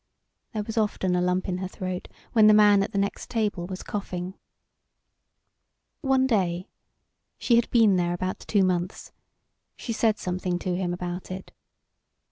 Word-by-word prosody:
There 215 -1 -2
was 225 +2 -2
often 190 -4 0
a 180 - +2
lump 180 +1 0
in 180 -1 -2
her 185 - -3
throat 185 -1 -5 0.3
when 220 -2 +6
the 215 - +7
man 205 -1 +6
at 195 - -2
the 205 - -3
next 200 0 -2
table 210 -6 -1
was 185 0 -6
coughing. 185 -3 -4 1.7
One 265 -2 +3
day, 185 -7 0 0.7
she 235 - +2
had 235 0 +3
been 220 -5 +5
there 175 0 0
about 185 +1 -3
two 205 -3 +1
months, 180 0 -1 0.6
she 230 - -4
said 220 -1 +2
something 180 -1 -2
to 180 0 -2
him 180 -1 -1
about 175 0 -5
it. 185 +1 -7
190 Hz, 160 wpm, -26 LUFS, 180-215 Hz, 1.7 s, the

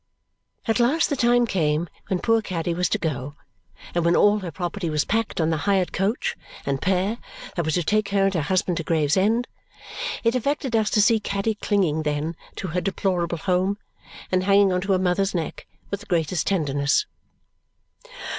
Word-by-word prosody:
At 225 +2 +2
last 285 +8 +2
the - - +2
time 240 -1 +3
came 165 -5 0 0.2
when 190 - 0
poor 225 +4 +2
Caddy 175 -4 -2
was 180 +1 0
to - - +1
go 145 -2 -3 0.6
and 175 - +1
when 170 +1 +3
all 205 +1 +4
her 185 -3 -5
property 175 +2 -3
was 150 -1 0
packed 225 -2 -1
on 160 0 +2
the 160 - +1
hired 190 -2 +2
coach 195 +5 0 0.3
and 135 -1 -1
pair 190 +5 0 0.4
that 170 -4 -1
was 160 - 0
to 175 - +1
take 210 +4 +1
her 200 -1 +2
and 195 - +1
her 170 - +1
husband 180 +3 0
to 165 - -2
Gravesend. 190 +10 +2 0.8
It 230 0 +3
affected 265 0 -1
us 215 -1 +2
to 210 - +4
see 225 +1 +4
Caddy 200 +1 -1
clinging, 195 -7 0
then, 150 +2 -2 0.2
to 185 - -4
her 180 +3 -1
deplorable 180 -3 -1
home 185 +3 0 0.5
and 185 0 +2
hanging 200 -1 +5
on 180 - 0
her 195 0 +2
mother's 185 +1 +1
neck 165 -3 -4 0.2
with 200 - -2
the 205 - -14
greatest 170 -1 0
tenderness. 145 - +1
185 Hz, 185 wpm, -24 LUFS, 165-205 Hz, 0.8 s, hanging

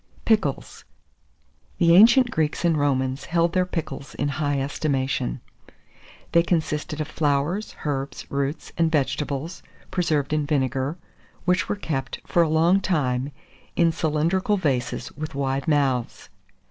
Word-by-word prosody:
PICKLES. 220 -2 0 0.9
The 170 -2 +5
ancient 240 +5 +7
Greeks 155 -2 -1
and 170 -2 +3
Romans 135 -2 0
held 170 0 +1
their 185 -1 +2
pickles 140 -6 -5
in 145 - -1
high 145 -1 -1
estimation. 135 - -1 0.9
They 170 - +5
consisted 155 -3 -1
of 155 - -2
flowers, 155 +6 -1
herbs, 140 -1 -3
roots, 140 +2 -2
and 165 -1 +3
vegetables, 150 +2 -1 0.3
preserved 155 -6 0
in 150 -1 0
vinegar, 135 +1 0
and - - -32
which 180 +1 +1
were - - +1
kept, 155 -9 -4
for 175 - +2
a 165 - +2
long 165 +5 +4
time, 140 -7 0 0.4
in 170 -1 +4
cylindrical 165 +6 +1
vases 135 -9 -1
with 155 +1 -7
wide 135 0 -1
mouths. 135 -5 0
150 Hz, 135 wpm, -24 LUFS, 140-170 Hz, 0.9 s, ancient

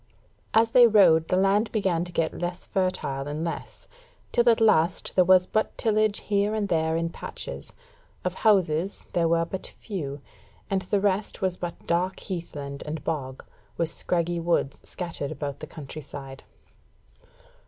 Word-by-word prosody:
As 225 +1 +5
they 245 -1 +8
rode, 175 -7 +5
the 185 - +2
land 200 +3 +3
began 190 -6 +1
to 175 - -8
get 165 -2 -1
less 175 +1 -3
fertile 145 -7 -1
and 150 +3 -3
less, 165 - -6 0.4
till 240 0 +4
at 230 - +4
last 185 -6 +3
there 185 - +5
was 185 0 +6
but 215 +3 -1
tillage 215 -1 +2
here 205 +1 +1
and 205 -2 -1
there 160 0 +1
in 165 0 -1
patches: - - -5 0.5
of 180 - 0
houses 190 -3 +2
there 170 -1 +2
were 165 0 +2
but 185 +2 -5
few, 150 -10 -6 0.5
and 195 -1 +1
the 195 +2 0
rest 200 0 0
was 185 -1 +1
but 175 -1 -6
dark 180 +2 0
heathland 145 -6 -6
and 150 0 -5
bog, 135 -5 -4 0.3
with 165 -1 +1
scraggy 170 0 -1
woods 170 -5 0
scattered 170 -5 -5
about 145 -2 -5
the 155 - -7
country 155 -1 -8
side. 135 -1 -9
175 Hz, 160 wpm, -26 LUFS, 160-195 Hz, 0.5 s, they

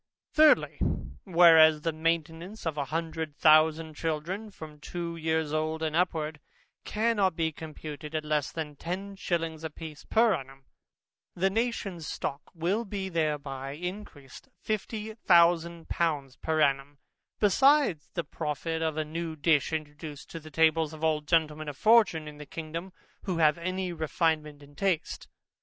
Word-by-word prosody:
Thirdly, 310 -1 +5 0.5
Whereas 165 -4 +7
the 165 - 0
maintainance 165 +5 -2
of 160 -2 -1
a 145 -2 -2
hundred 160 0 -3
thousand 155 +1 +4
children, 165 +7 -3
from 155 -6 -11
two 170 +2 -5
years 160 -2 -1
old, 155 +1 -1
and 155 -1 -1
upwards, 160 -3 0 0.4
cannot 210 -5 +1
be 160 -1 0
computed 155 -1 -8
at 155 -1 -2
less 150 -2 0
than 155 -3 -5
ten 190 +6 -5
shillings 165 -4 -2
a 160 - -3
piece 155 -1 -9
per 225 -1 +3
annum, 135 -3 -7 0.7
the 190 +2 +1
nation's 200 -7 -2
stock 140 -2 -4
will 180 +7 0
be 195 -3 -4
thereby 145 -5 -2
encreased 180 - -8
fifty 215 0 -3
thousand 170 -4 +3
pounds 145 -6 -1
per 160 -1 -1
annum, 140 -1 +1 0.4
besides 250 - +4
the 170 - -1
profit 160 +2 -3
of 160 -1 -1
a 155 - 0
new 160 +1 -4
dish, 150 -1 +2
introduced 150 -1 -6
to 165 - -6
the 155 0 -12
tables 160 0 +2
of 155 0 -10
all 155 -1 +2
gentlemen 155 -1 0
of 145 - -8
fortune 215 - +4
in 150 -1 -9
the 150 - -9
kingdom, 165 +4 -6 0.3
who 185 -3 -1
have 155 0 +4
any 185 +1 -2
refinement 155 -2 -1
in 145 0 -16
taste. 185 -1 -1
160 Hz, 150 wpm, -28 LUFS, 150-175 Hz, 0.7 s, Whereas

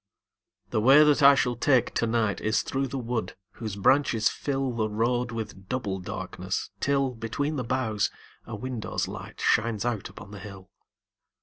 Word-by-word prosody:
The 110 - +1
way 135 +6 +8
that 150 0 +4
I 140 0 +8
shall 125 -2 +1
take 125 +1 +2
to 115 - +1
night 110 -3 0
Is 110 0 +1
through 135 0 -1
the 135 +2 -5
wood 115 -6 -3 0.2
whose 110 -4 -6
branches 115 +1 +3
fill 135 -2 -2
The 110 -2 -1
road 120 +3 0
with 110 -4 -6
double 105 -7 -2
darkness, 90 - -4
till, 135 -1 +1
Between 125 +7 -3
the 130 - -2
boughs, 115 -4 0 0.4
a 115 - -5
window's 120 +1 -3
light - - -8
Shines 110 0 +1
out 115 -5 -2
upon 100 - -12
the 100 - -8
hill. 95 -1 -11
115 Hz, 170 wpm, -27 LUFS, 105-130 Hz, 0.4 s, way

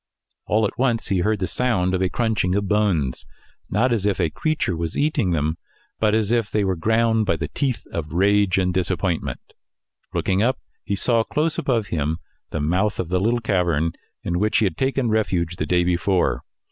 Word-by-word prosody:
All 110 +1 +2
at 105 - -4
once 120 -5 +1
he 95 -2 +2
heard 105 +4 +1
the 95 - -1
sound 95 -6 0
of 95 - 0
a 95 - +2
crunching 110 -6 0
of 100 0 0
bones 95 -11 +1 0.5
not 120 +5 +2
as 110 -5 0
if 100 - 0
a 85 -4 +1
creature 155 - -1
was 80 -1 -3
eating 145 -9 +1
them, 80 -1 0 0.4
but 110 -1 +3
as 110 -1 +1
if 115 -4 +1
they 105 - +1
were 95 -1 0
ground 110 +4 +2
by 85 - +2
the 80 -2 -4
teeth 130 - -2
of 75 -3 -4
rage 100 +2 +3
and 90 -1 +1
disappointment; 90 -1 -1 0.7
looking 95 +1 0
up, 125 +3 +2 0.3
he 100 - -1
saw 115 +3 +2
close 155 +6 -1
above 115 -6 0
him 80 0 -1 0.3
the 80 - -3
mouth 90 +8 0
of 85 - -2
the 90 0 +1
little 115 +5 +1
cavern 85 -7 +1 0.3
in 85 0 -1
which 105 +2 +2
he 110 - +3
had 90 -5 -1
taken 135 0 0
refuge 90 -6 0
the - - -2
day 90 0 +3
before. 90 +1 +1
100 Hz, 195 wpm, -22 LUFS, 90-110 Hz, 0.7 s, but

